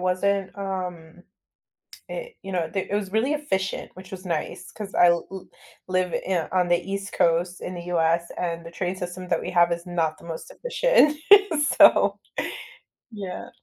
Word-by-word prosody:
wasn't, 190 +2 0
um 180 -4 -5 0.9
it, - - -6
you 195 - -7
know, 170 -3 0
d 195 - -1
it - - -1
was 200 -2 -3
really 230 +7 +2
efficient, 195 -11 -2
which 185 0 -12
was 190 0 -8
nice 175 +2 -3
'cause 205 -2 -8
I 175 - +6
l 170 -1 +2
l 190 -1 -8 0.4
live 185 -1 0
yeah 180 -4 0
on 180 -1 +2
the 175 0 +4
east 195 0 -4
coast 170 +2 +1
in 185 - -5
the 175 -1 -7
US 170 0 +2
and 170 -1 -3
the 165 - -9
train 180 +2 -3
system 180 0 -6
that 170 - +1
we - - -4
have 175 -1 +4
is 170 +1 -4
not 165 -3 -1
the - - -16
most 165 -1 -7
efficient, - - +3 0.6
so, - - +6 0.9
yeah. 200 -4 -6
180 Hz, 175 wpm, -25 LUFS, 170-195 Hz, 0.9 s, I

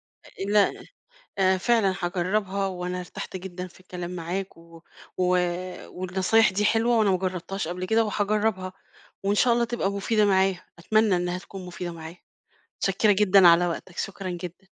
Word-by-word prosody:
آآ 195 - -9
لا 205 -1 +4 0.7
آآ، 190 -1 +4
فعلًا 200 -2 +2
هاجربها 190 +2 -1
وأنا 180 -1 -4
ارتحت 180 +1 -7
جدًا 180 0 -7
في 180 - -18
الكلام 180 -1 -7
معاك، 180 +3 -4
و 165 0 -16 0.3
و 185 - +1 0.6
والنصايح 185 +5 +2
دي 205 +2 0
حلوة 225 +2 +3
وأنا 210 -3 +3
ما 185 - +3
جربتهاش 185 -1 -3
قبل 180 +1 -4
كده 225 +3 +2
وهاجربها 205 -2 -1 0.5
وإن 200 +1 +2
شاء 240 +3 +4
الله 240 - +2
تبقى 235 -4 -1
مفيدة 210 +2 +1
معايا، 190 -2 +2
أتمنى 215 +2 +2
إنها 180 0 -2
تكون 185 0 -10
مفيدة 175 -1 -6
معايا، 165 +1 -9 0.6
متشكرة 200 +2 +2
جدًا 195 -2 +6
على 170 +1 +5
وقتك 175 +1 -5
شكرًا 195 -1 -4
جدًا. 175 +2 -7
190 Hz, 160 wpm, -25 LUFS, 180-205 Hz, 0.7 s, جدًا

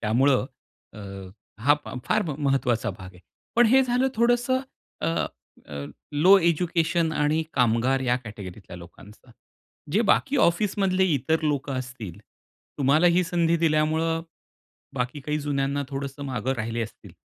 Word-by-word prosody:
त्यामुळं 130 +5 +2 0.5
अ, 105 - -12 0.7
हा 145 +2 +6
फा - - -8
फार 215 0 +1 0.2
महत्त्वाचा 135 -5 +1
भाग 95 -4 -10
आहे. 90 - -16 0.4
पण 240 0 +6
हे 265 +4 +5
झालं 255 +1 +1
थोडंसं 245 +2 +2 0.4
अ, - - -1 0.6
अ, 70 -1 -6 0.3
लो 180 +7 +6
एज्युकेशन 170 -1 +1
आणि 150 +1 +1
कामगार 125 +2 +2
या 125 -1 +1
कॅटेगरीतल्या 100 -4 -9
लोकांचा, 100 +7 -15 0.6
जे 205 - +3
बाकी 280 +1 0
ऑफिसमधले 190 +1 +1
इतर 160 +5 0
लोकं 145 -3 -1
असतील 120 -8 -7 0.6
तुम्हाला 145 +5 +4
ही 175 +1 +4
संधी 170 -1 +1
दिल्यामुळं, 160 0 +1 0.7
बाकी 125 +3 -3
काही 150 +2 -2
जुन्यांना 140 -1 -1
थोडंसं 140 +1 -5
मागे 130 0 -2
राहिले 115 +1 -2
असतील. 115 - -8
145 Hz, 130 wpm, -25 LUFS, 125-170 Hz, 0.7 s, हा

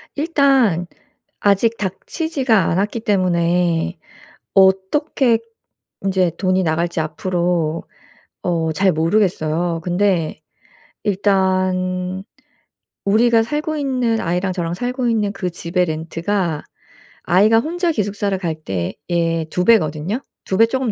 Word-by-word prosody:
일단 270 - +2 0.5
아직 205 +3 +2
닥치지가 245 - 0
않았기 205 +7 0
때문에 175 -4 +1 0.5
어떻게 200 +6 +3 0.7
인제 185 -3 +1
돈이 185 0 +1
나갈지 170 +1 0
앞으로 170 0 -1 0.6
어 165 -3 0
잘 190 +3 +3
모르겠어요. 165 -1 0
근데 175 -3 0 0.6
일단 185 -2 0 0.8
우리가 225 +3 +4
살고 300 +5 -2
있는 250 -5 0
아이랑 180 +2 -1
저랑 170 -2 -2
살고 250 +4 -2
있는 215 -3 +1
그 185 -2 -3
집의 175 +1 0
렌트가 165 +1 -2 0.6
아이가 210 +6 +4
혼자 345 +5 -1
기숙사를 205 -5 -1
갈 170 -4 -3
때에 165 - -2
2 180 - -1
배거든요. 180 - +2 0.3
2 190 - -1
배 225 - +7
조금 260 0 -1
190 Hz, 225 characters per minute, -19 LUFS, 170-225 Hz, 0.8 s, 배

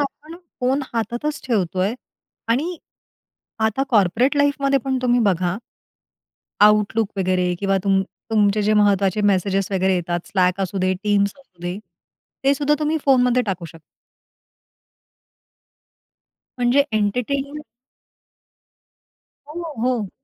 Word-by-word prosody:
आपण 300 +3 -5 0.2
फोन 260 +3 +1
हातातच 240 +6 -2
ठेवतो 190 -7 -1
आहे 195 +5 +1 0.5
आणि 300 +10 0 0.9
आता 220 +5 -1
कॉर्पोरेट 230 +5 +2
लाईफमध्ये 280 -1 +2
पण 265 -1 0
तुम्ही 245 -1 +3
बघा. 185 -4 +1 1.1
आउटलुक 210 +1 +3
वगैरे 180 -1 +1
किंवा 195 -1 +1
तुम 195 -1 +3 0.3
तुमचे 210 -1 +2
जे 210 +1 +2
महत्त्वाचे 200 -1 +2
मेसेज 195 -1 +1
वगैरे 190 0 +2
येतात, 175 -1 -2
स्लॅक 185 -1 +1
असू 195 +1 -2
दे, 185 0 +1
टीम्स 205 -1 +2
असू 185 -11 -22
दे 175 +1 -3 0.7
ते 275 +1 +4
सुद्धा 290 +1 +1
तुम्ही 305 +1 0
फोनमध्ये 250 -2 +4
टाकू 190 -5 -4
शकता. 165 0 -12 2.8
म्हणजे 250 +3 +3
एन्टरटेनमेंट. 270 +8 -1 1.9
हो, 330 +1 -6
हो. 240 -6 0
215 Hz, 115 wpm, -21 LUFS, 190-270 Hz, 2.8 s, ते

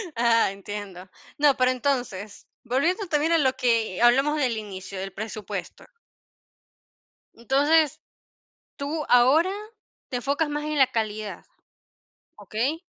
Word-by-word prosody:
Ah, 230 -3 +3
entiendo. 195 -2 -8 0.3
No, 290 -2 +4
pero 255 0 +3
entonces, 245 -6 -3 0.2
volviendo 335 - 0
también 315 +1 +1
a 330 - +5
lo 265 -4 +2
que 230 -4 0
hablamos 270 +5 +4
del 250 -6 0
inicio, 195 -2 -7
del 195 -1 -6
presupuesto. 215 0 -6 1.5
Entonces, 285 +5 +2 0.8
tú 300 +1 -3
ahora, 275 +9 +5 0.6
te 250 - -2
enfocas 285 +5 -1
más 295 0 -3
en 305 0 -2
la 265 -2 +6
calidad, 215 -2 -4 0.9
¿okey? 260 +9 -2
250 Hz, 115 wpm, -25 LUFS, 215-295 Hz, 1.5 s, la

